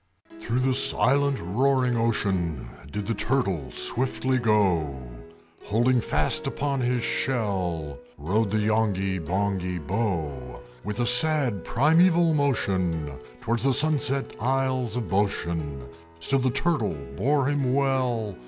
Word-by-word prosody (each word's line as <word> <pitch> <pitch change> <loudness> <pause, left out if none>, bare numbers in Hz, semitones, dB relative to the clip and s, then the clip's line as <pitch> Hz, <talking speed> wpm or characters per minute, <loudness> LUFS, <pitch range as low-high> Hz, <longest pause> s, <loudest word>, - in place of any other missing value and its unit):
Through 115 +3 -2
the 130 0 +1
silent 140 +1 +2
roaring 125 +6 +1
ocean 95 - -1 0.3
Did 105 0 -4
the 115 - -1
Turtle 100 - -1
swiftly 130 - 0
go; 95 - +1 0.7
Holding 120 +4 +2
fast 155 +5 0
upon 140 0 -2
his 125 -1 0
shell 90 - -2 0.2
Rode 100 +9 -1
the 110 - 0
Yonghy 105 -3 0
Bonghy 90 +1 -2
Bò. 75 - -3 0.2
With 105 +4 -3
a - - +1
sad 125 -3 +4
primaeval 165 +5 +3
motion 95 - -1 0.3
Towards 115 +1 -1
the 135 0 +2
sunset 145 -2 +2
isles 130 -1 -1
of 125 - -2
Boshen 85 -7 -2 0.3
Still 135 +11 0
the 130 0 +1
Turtle 140 - -1 0.2
bore 140 - +1
him 140 -2 0
well. 130 -6 0
115 Hz, 120 wpm, -25 LUFS, 95-135 Hz, 0.7 s, sad